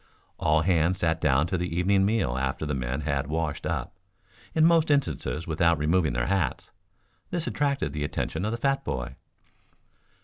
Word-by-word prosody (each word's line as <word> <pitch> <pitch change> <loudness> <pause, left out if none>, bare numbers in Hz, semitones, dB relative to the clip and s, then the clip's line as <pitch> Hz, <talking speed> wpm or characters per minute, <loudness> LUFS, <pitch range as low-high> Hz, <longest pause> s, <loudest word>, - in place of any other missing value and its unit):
All 75 +1 +2
hands 85 0 +2
sat 80 -2 0
down 70 +3 +3
to 90 +1 -2
the 85 -1 -3
evening 95 +2 +3
meal 105 - 0
after 65 +3 -2
the 75 - -2
men 65 +2 -2
had 70 -3 -1
washed 80 0 -2
up, - - -3 0.6
in 160 0 +5
most 165 -1 +4
instances 85 - 0
without 85 +1 +2
removing 80 -1 +1
their - - 0
hats. 95 -4 -1 0.6
This 175 -2 -1
attracted 140 - -1
the 75 -1 -2
attention 80 +3 -3
of 105 - 0
the 115 - -2
fat 135 +3 0
boy. 65 +1 -4
80 Hz, 170 wpm, -27 LUFS, 75-100 Hz, 0.6 s, in